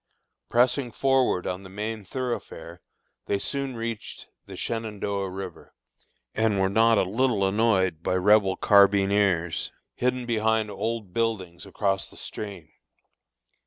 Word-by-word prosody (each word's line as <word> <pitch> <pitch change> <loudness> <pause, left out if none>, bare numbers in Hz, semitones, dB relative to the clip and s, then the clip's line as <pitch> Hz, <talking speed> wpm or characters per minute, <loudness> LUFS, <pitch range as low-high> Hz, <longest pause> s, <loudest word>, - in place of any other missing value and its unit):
Pressing 125 +1 +2
forward 130 -8 +2
on 90 +1 -3
the 95 - -11
main 105 +2 -4
thoroughfare, 95 -8 -5 0.5
they 100 - +1
soon 135 +5 -3
reached 115 -1 -5 0.2
the - - -9
Shenandoah 105 -4 -3
river, 95 -2 -8 0.6
and 110 -2 +1
were 95 0 +2
not 115 +1 +4
a - - +4
little 105 0 +1
annoyed 95 -5 +2
by 90 - 0
Rebel 95 +1 +4
carbineers, 100 -4 +3 0.2
hidden 125 0 -1
behind 110 -2 +1
old 105 -1 -4
buildings 100 -6 -2
across 95 0 -1
the - - -14
stream. 95 -7 -7
105 Hz, 125 wpm, -26 LUFS, 95-115 Hz, 0.6 s, not